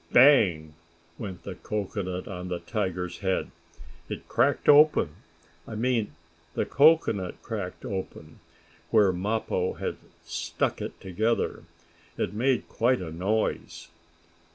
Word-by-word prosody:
"Bang!" 95 - +5 0.5
went 95 -5 -6
the 100 - -5
cocoanut 95 -2 -4
on 90 -2 -6
the 90 -1 -2
tiger's 90 -3 -3
head. 95 -1 -1 0.6
It - - -6
cracked - - +1
open 145 - +6 0.5
I 110 - -6
mean 115 -3 0 0.4
the - - 0
cocoanut 140 - +3
cracked 105 -1 -5
open 95 -6 -6 0.5
where 105 -4 +4
Mappo 95 -1 -1
had - - -4 0.3
stuck 85 0 -2
it - - -6
together. 110 +5 -1 0.5
It 95 - -1
made 125 +3 +1
quite 125 +2 +2
a 85 -3 -6
noise. 100 +7 -2
100 Hz, 115 wpm, -27 LUFS, 90-115 Hz, 0.6 s, open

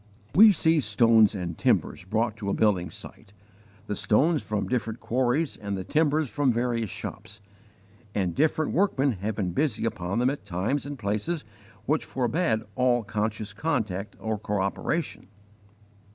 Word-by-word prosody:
We 215 +2 +9
see 165 -3 +3
stones 110 -2 +4
and 90 -3 -4
timbers - - 0
brought 110 +3 0
to 100 -2 -4
a - - 0
building 95 -5 +2
site 100 - -11 0.5
the 105 - -3
stones 135 +11 +2
from 105 -2 -2
different 115 -2 -2
quarries 130 +5 0
and 100 -2 -4
the 95 - -4
timbers 155 - +1
from 140 +1 +1
various 115 -2 -1
shops 105 +4 -7 0.8
and 95 -4 0
different 155 - +1
workmen 150 -7 +2
have 105 0 -3
been 95 -4 -1
busy 115 - 0
upon 90 -3 -2
them 125 +2 +3
at 145 - -6
times 100 +10 -2
and 145 -1 -6
places 110 +9 -2 0.4
which 150 +3 +1
forbade 125 -2 0
all 125 -1 +2
conscious 105 0 -3
contact 105 - -2
or 110 -1 -2
cooperation. 105 - -2
110 Hz, 150 wpm, -26 LUFS, 100-140 Hz, 0.8 s, We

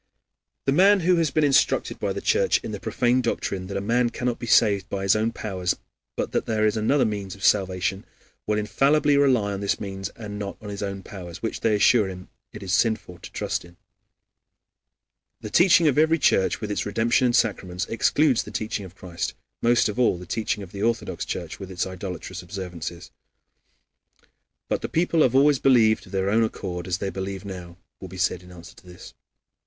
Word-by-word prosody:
The 135 - +2
man 195 +6 +5
who 180 +1 +3
has 165 -3 +2
been 155 +2 +1
instructed 140 -2 +2
by - - -1
the - - -4
Church 470 +1 +2
in - - -5
the - - -5
profane 125 -1 +1
doctrine 95 -5 -2
that 100 0 -4
a - - -2
man 120 +4 +1
cannot 120 0 -3
be 120 - -6
saved 100 -3 +3
by 95 -1 -3
his 100 +1 +4
own 110 +2 +1
powers, 95 -6 -2 0.4
but - - -3
that - - -1
there 110 -1 +1
is 105 0 +2
another 120 +6 +2
means 100 -3 -4
of 100 - -13
salvation, 95 0 +1 0.4
will 105 0 +1
infallibly 140 +7 +2
rely 130 -8 +3
upon 100 - -3
this 100 0 -1
means 95 -2 -5
and 105 -2 -7
not 100 -1 -5
on 105 - -9
his 100 0 -6
own 100 -1 -4
powers, 90 -2 -9
which, 115 - -3
they 110 -2 +2
assure 105 +1 +4
him, 90 -1 -9 0.2
it 105 - -9
is 95 -1 -3
sinful 110 -5 0
to - - -11
trust - - -3
in. 85 0 -17 1.6
The 110 - -7
teaching 175 - +5
of 145 0 +3
every 160 +1 +4
Church, 95 - +2
with 105 -1 -3
its 105 - -1
redemption 115 +5 +1
and 120 - +1
sacraments, 90 -6 0
excludes 130 +3 +2
the - - -9
teaching 105 -2 -3
of 95 0 -13
Christ; 90 -4 -5 0.3
most 120 0 +3
of 105 +3 -4
all 120 -7 +3
the 90 - -9
teaching 105 +1 -2
of 90 - -11
the 100 - -7
Orthodox 115 +1 -1
Church - - -5
with 95 - -8
its 90 -2 -2
idolatrous 95 -1 -6
observances. 90 -2 -7 1.6
"But - - -1
the - - -4
people 165 -1 +1
have 130 -3 +3
always 140 0 +5
believed 115 -5 +4
of - - -15
their 95 0 0
own 115 +2 +3
accord 90 -5 -4
as 90 -1 -1
they 95 +1 -3
believe 95 0 -5
now," 90 -3 -8 0.2
will 95 - -8
be 95 +1 -10
said 90 -1 0
in 90 0 -15
answer 90 +1 -12
to - - -18
this. 90 0 -12
105 Hz, 205 wpm, -24 LUFS, 95-120 Hz, 1.6 s, man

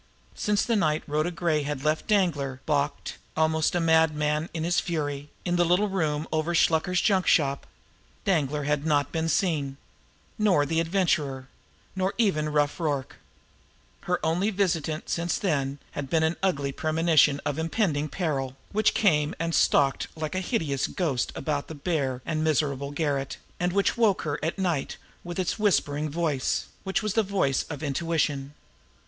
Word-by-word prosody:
Since 210 0 0
the 235 - +1
night 155 -6 +1
Rhoda 155 +3 0
Gray 170 -3 0
had 145 -1 -4
left 155 0 0
Danglar, 155 -11 +1
balked, 145 -1 -1 0.2
almost 160 +1 +2
a - - +2
madman 160 -1 +2
in 160 -1 -3
his 175 +1 +2
fury, 145 -4 -3 0.2
in 175 -1 +1
the 175 - +4
little 180 +5 +2
room 155 -5 -1
over 160 +2 0
Shluker's 170 +3 +3
junk 190 -2 +2
shop, 140 -3 +2 0.6
Danglar 150 -5 +1
had 145 0 0
not 145 -3 +1
been 165 0 -1
seen 145 -6 0 0.6
nor 185 -9 +3
the 160 +3 0
Adventurer 160 -7 0 0.5
nor 190 +1 -1
even 155 -10 +1
Rough 150 +2 +1
Rorke. 145 -5 -2 0.9
Her - - +2
only 175 +6 +1
visitant 165 -6 -1
since 170 0 -1
then 140 -7 -1
had 140 -2 -5
been 160 +1 +2
an 160 +2 +1
ugly 145 -8 0
premonition 155 -1 +3
of 145 +1 -1
impending 160 -3 0
peril, 140 -6 -2
which 215 +1 +2
came 150 -8 +2
and 165 0 -1
stalked 140 -3 +3
like 155 -1 -3
a 185 - 0
hideous 160 - -1
ghost 145 -9 -1
about 145 0 -2
the 160 - -7
bare 140 -5 -2
and 155 -1 -1
miserable 140 -3 0
garret, 145 -2 -2 0.2
and 180 0 +1
which 200 +5 +1
woke 220 -5 +3
her 150 -2 -2
at 160 +4 -1
night 175 -7 -1 0.3
with 175 -1 -6
its 185 +3 -1
whispering 155 -7 +1
voice 150 -4 -1
which 190 +2 -1
was 215 -2 -1
the 225 - +3
voice 190 -10 0
of 145 -1 -6
intuition. 145 -1 -1
155 Hz, 160 wpm, -26 LUFS, 145-175 Hz, 0.9 s, the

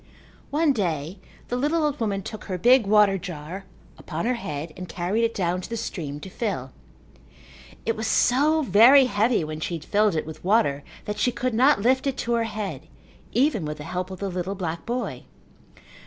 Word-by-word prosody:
One 300 0 +2
day 170 - -2 0.3
the 245 - -1
little 300 +6 +1
old 295 -1 0
woman 200 -4 -1
took 215 - -8
her 185 -2 -3
big 245 +2 +5
water 205 -2 +4
jar 175 +1 -7 0.3
upon 165 +2 -4
her 250 - +2
head 155 -9 -5
and 180 0 -8
carried 185 +6 -1
it 230 0 0
down 180 -1 0
to - - -8
the 230 - -3
stream 155 -10 -5
to 190 - -8
fill. 175 - -3 1.1
It 225 - 0
was 220 0 -3
so 305 +5 +3
very 255 +5 +7
heavy 220 -3 +1
when 155 0 -5
she 170 +2 -3
had 160 - -8
filled 210 -2 +2
it 155 - -1
with 160 0 -9
water 185 -8 +2 0.2
that 210 - -4
she 250 - +2
could 250 0 -2
not 255 -1 +4
lift 260 +3 +2
it 270 -1 -1
to 235 - -1
her 230 -1 +1
head 210 -3 -5 0.5
even 255 - +2
with 150 0 -4
the 150 - -8
help 180 +4 -4
of 190 - -7
the 200 +1 -3
little 185 +2 -3
black 170 -3 -4
boy. 245 +1 -3
205 Hz, 200 wpm, -25 LUFS, 175-240 Hz, 1.1 s, very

